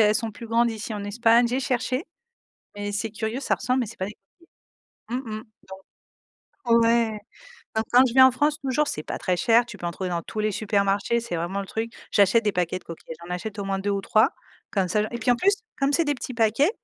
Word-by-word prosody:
elles 210 Hz, 0 st, +4 dB
sont 225 Hz, -1 st, -1 dB
plus 230 Hz, +1 st, -9 dB
grandes 230 Hz, +1 st, +2 dB
ici, 220 Hz, 0 st, -5 dB
en 205 Hz, -1 st, -4 dB
Espagne, 230 Hz, +3 st, +4 dB
j'ai 255 Hz, +2 st, 0 dB
cherché 255 Hz, +2 st, -1 dB, 0.7 s
mais 205 Hz, 0 st, -4 dB
c'est 205 Hz, +2 st, -2 dB
curieux 220 Hz, +4 st, -3 dB
ça 280 Hz, -, 0 dB
ressemble 255 Hz, +1 st, 0 dB
mais 240 Hz, -, -1 dB
c'est 230 Hz, +3 st, -11 dB
pas 190 Hz, -, -2 dB
des 210 Hz, -, -8 dB, 0.9 s
coquilles. 245 Hz, +2 st, -2 dB
Mmh 220 Hz, -4 st, -5 dB
mh, 220 Hz, -, -9 dB, 1.0 s
donc 240 Hz, -6 st, +1 dB
ouais, 230 Hz, -2 st, +2 dB, 0.6 s
donc 220 Hz, -, +1 dB
quand 255 Hz, +2 st, +7 dB
je 240 Hz, -, -3 dB
viens 260 Hz, +1 st, +8 dB
en -, -, +1 dB
France 295 Hz, +4 st, +1 dB
toujours 275 Hz, +3 st, +1 dB
c'est 150 Hz, -, -3 dB
pas -, -, -5 dB
très 180 Hz, -, 0 dB
cher, 235 Hz, +3 st, +4 dB
tu -, -, -10 dB
peux 175 Hz, -, -4 dB
en 170 Hz, -, -1 dB
trouver 185 Hz, +1 st, -4 dB
dans 170 Hz, -1 st, -2 dB
tous 215 Hz, -, -8 dB
les 215 Hz, 0 st, 0 dB
supermarchés, 200 Hz, +2 st, +1 dB
c'est 235 Hz, -5 st, -5 dB
vraiment 175 Hz, +4 st, -2 dB
le 195 Hz, -, -6 dB
truc, 225 Hz, +3 st, -3 dB, 0.2 s
j'achète 210 Hz, +3 st, +4 dB
des 210 Hz, -, +2 dB
paquets 180 Hz, 0 st, -1 dB
de -, -, -26 dB
coquillettes, 165 Hz, -1 st, -9 dB
j'en 180 Hz, -, -3 dB
achète 210 Hz, +3 st, -6 dB
au 200 Hz, -, -3 dB
moins 195 Hz, 0 st, -1 dB
2 205 Hz, +1 st, -1 dB
ou 200 Hz, -, 0 dB
3 215 Hz, +5 st, +4 dB, 0.4 s
comme 195 Hz, -3 st, +1 dB
ça 210 Hz, +4 st, +1 dB
et 235 Hz, -, -4 dB
puis 235 Hz, +2 st, +1 dB
en -, -, +1 dB
plus 395 Hz, +10 st, +3 dB, 0.3 s
comme 275 Hz, +1 st, +2 dB
c'est 335 Hz, -, +3 dB
des 290 Hz, -1 st, +1 dB
petits 255 Hz, -1 st, -6 dB
paquets, 225 Hz, -, +3 dB
225 Hz, 245 wpm, -25 LUFS, 200-245 Hz, 1.0 s, viens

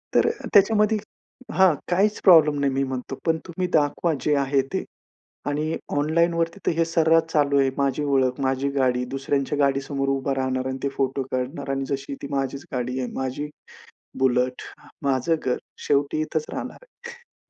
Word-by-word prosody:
तर -, -, +5 dB, 0.2 s
त्याच्यामध्ये 210 Hz, +1 st, +5 dB, 0.6 s
हां, 190 Hz, -3 st, +5 dB, 0.2 s
काहीच 200 Hz, +4 st, +2 dB
प्रॉब्लेम 155 Hz, -6 st, +6 dB
नाही 140 Hz, -1 st, +1 dB
मी 135 Hz, -, +1 dB
म्हणतो 130 Hz, 0 st, -4 dB
पण 160 Hz, -1 st, +2 dB
तुम्ही 180 Hz, +2 st, -2 dB
दाखवा 155 Hz, +2 st, +2 dB
जे 150 Hz, +3 st, +2 dB
आहे 140 Hz, 0 st, +2 dB
ते, -, -, -1 dB, 0.6 s
आणि 150 Hz, +2 st, -1 dB, 0.2 s
ऑनलाईनवरती 170 Hz, +4 st, +1 dB
तर -, -, +3 dB
हे 165 Hz, -, +3 dB
सर्रास 165 Hz, 0 st, +3 dB
चालू 140 Hz, -2 st, +3 dB
आहे, 135 Hz, -, +3 dB
माझी 140 Hz, +1 st, 0 dB
ओळख, 130 Hz, -2 st, +1 dB
माझी 135 Hz, +1 st, 0 dB
गाडी. 125 Hz, -2 st, +2 dB
दुसऱ्यांच्या 140 Hz, +1 st, -1 dB
गाडीसमोर 135 Hz, 0 st, 0 dB
उभं 135 Hz, 0 st, 0 dB
राहणार 130 Hz, 0 st, -1 dB
आणि 130 Hz, -, -3 dB
ते 140 Hz, -, +1 dB
फोटो 135 Hz, 0 st, -1 dB
काढणार 135 Hz, +3 st, -3 dB
आणि 135 Hz, 0 st, -1 dB
जशी 140 Hz, 0 st, -3 dB
ती -, -, -5 dB
माझीच 135 Hz, 0 st, -2 dB
गाडी 125 Hz, +1 st, -2 dB
आहे, 125 Hz, -, -2 dB
माझी 130 Hz, +3 st, -3 dB, 0.7 s
बुलेट, 125 Hz, -1 st, +1 dB, 0.4 s
माझं 135 Hz, +4 st, +1 dB
घर 125 Hz, -, 0 dB, 0.3 s
शेवटी 145 Hz, +2 st, +1 dB
इथंच 155 Hz, 0 st, -2 dB
राहणार -, -, -5 dB
आहे. 475 Hz, -1 st, -15 dB
140 Hz, 160 wpm, -24 LUFS, 135-160 Hz, 0.7 s, प्रॉब्लेम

